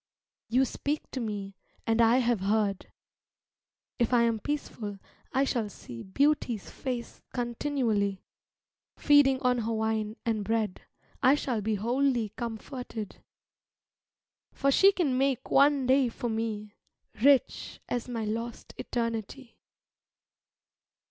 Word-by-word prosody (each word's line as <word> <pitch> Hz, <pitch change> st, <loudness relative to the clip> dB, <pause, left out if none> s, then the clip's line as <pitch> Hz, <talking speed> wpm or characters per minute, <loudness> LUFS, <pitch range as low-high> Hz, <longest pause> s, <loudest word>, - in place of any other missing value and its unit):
You 255 Hz, +3 st, +4 dB
speak 290 Hz, +4 st, -3 dB
to 265 Hz, -, -3 dB
me 205 Hz, -4 st, -4 dB, 0.3 s
and 225 Hz, 0 st, +2 dB
I 230 Hz, +2 st, +5 dB
have 240 Hz, -4 st, +2 dB
heard: 200 Hz, 0 st, 0 dB, 1.1 s
If 240 Hz, +1 st, +2 dB
I 235 Hz, -, +5 dB
am 230 Hz, -1 st, +1 dB
peaceful, 215 Hz, -6 st, -4 dB, 0.3 s
I 270 Hz, +1 st, +2 dB
shall 235 Hz, -6 st, -1 dB
see 120 Hz, -, -10 dB
Beauty's 250 Hz, -1 st, 0 dB
face 245 Hz, -3 st, -5 dB
continually; 235 Hz, -5 st, -1 dB, 0.7 s
Feeding 285 Hz, -3 st, +5 dB
on 250 Hz, -1 st, +3 dB
her 230 Hz, 0 st, -1 dB
wine 220 Hz, -1 st, -1 dB
and 220 Hz, -3 st, 0 dB
bread 215 Hz, -2 st, -1 dB, 0.4 s
I 270 Hz, +1 st, +6 dB
shall 250 Hz, -6 st, -2 dB
be 215 Hz, +1 st, 0 dB
wholly 240 Hz, +1 st, +1 dB
comforted, 230 Hz, 0 st, -6 dB, 1.4 s
For 275 Hz, 0 st, +1 dB
she 390 Hz, +8 st, +6 dB
can 295 Hz, -10 st, 0 dB
make 270 Hz, -2 st, 0 dB
one 280 Hz, -1 st, +5 dB
day 260 Hz, 0 st, +4 dB
for 240 Hz, +1 st, -4 dB
me 220 Hz, -2 st, -3 dB, 0.5 s
Rich 275 Hz, +1 st, +3 dB
as 245 Hz, 0 st, -2 dB
my 230 Hz, -3 st, -3 dB
lost 230 Hz, +2 st, -5 dB
eternity. 230 Hz, +2 st, -4 dB
235 Hz, 120 wpm, -29 LUFS, 220-265 Hz, 1.4 s, I